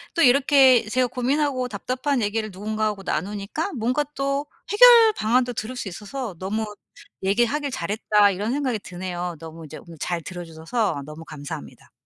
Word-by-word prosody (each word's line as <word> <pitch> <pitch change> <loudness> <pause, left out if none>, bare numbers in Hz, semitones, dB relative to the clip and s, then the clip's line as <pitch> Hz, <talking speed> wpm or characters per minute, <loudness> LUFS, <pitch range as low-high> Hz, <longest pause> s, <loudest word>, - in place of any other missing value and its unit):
또 335 - +3
이렇게 265 -1 +6
제가 255 +3 +2
고민하고 260 +1 0
답답한 255 +4 -2
얘기를 215 +1 -1
누군가하고 210 +1 -2
나누니까 205 - -3
뭔가 250 +4 0
또 275 +1 -1 0.2
해결 460 0 +8
방안도 245 +3 +1
들을 230 +3 -5
수 245 - -5
있어서 210 +2 -6
너무 215 +4 -2 0.6
'얘기하길 240 +9 +1
잘했다.' 205 +1 +2
이런 205 +5 -2
생각이 260 -5 -1
드네요. 180 -2 -5
너무 165 0 -10
이제 150 - -9
오늘 165 -2 -13
잘 175 -2 -2
들어 175 -1 -7
주셔서 165 +1 -2
너무 150 +2 -9
감사합니다. 145 - -9
220 Hz, 375 characters per minute, -23 LUFS, 185-260 Hz, 0.6 s, 해결